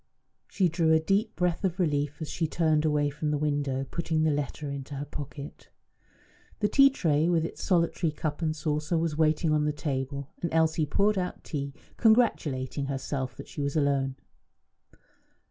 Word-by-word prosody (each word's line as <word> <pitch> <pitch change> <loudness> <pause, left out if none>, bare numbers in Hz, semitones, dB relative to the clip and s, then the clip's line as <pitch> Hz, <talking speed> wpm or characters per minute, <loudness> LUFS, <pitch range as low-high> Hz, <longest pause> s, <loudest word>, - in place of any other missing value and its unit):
She 190 - +2
drew 165 -1 +2
a 160 - +5
deep 200 +7 0
breath 180 +1 0
of 190 -1 -1
relief 150 -4 0
as - - -5
she 165 +1 -1
turned 155 -1 +2
away 150 -1 +2
from 150 +1 -3
the 150 - +1
window, 145 -2 -1
putting 160 -2 0
the 160 - +3
letter 145 0 -3
into 140 +1 -6
her 140 +1 -4
pocket. 145 0 -8 0.9
The 210 - +2
tea 275 +5 +6
tray, 160 - +1
with 165 -2 +2
its - - -7
solitary 170 -2 +1
cup 150 +1 -4
and 155 -1 0
saucer, 150 +1 -1
was 160 -2 0
waiting 155 +1 +2
on 150 -1 +2
the 150 - +2
table, 140 -1 -4
and 170 - -2
Elsie 160 -1 +2
poured 200 +6 +2
out 180 -1 -4
tea, 140 -2 -4 0.2
congratulating 145 - +2
herself 135 -1 -3
that - - -9
she - - -6
was 140 +1 -2
alone. 140 -2 +1
150 Hz, 175 wpm, -28 LUFS, 145-165 Hz, 0.9 s, tea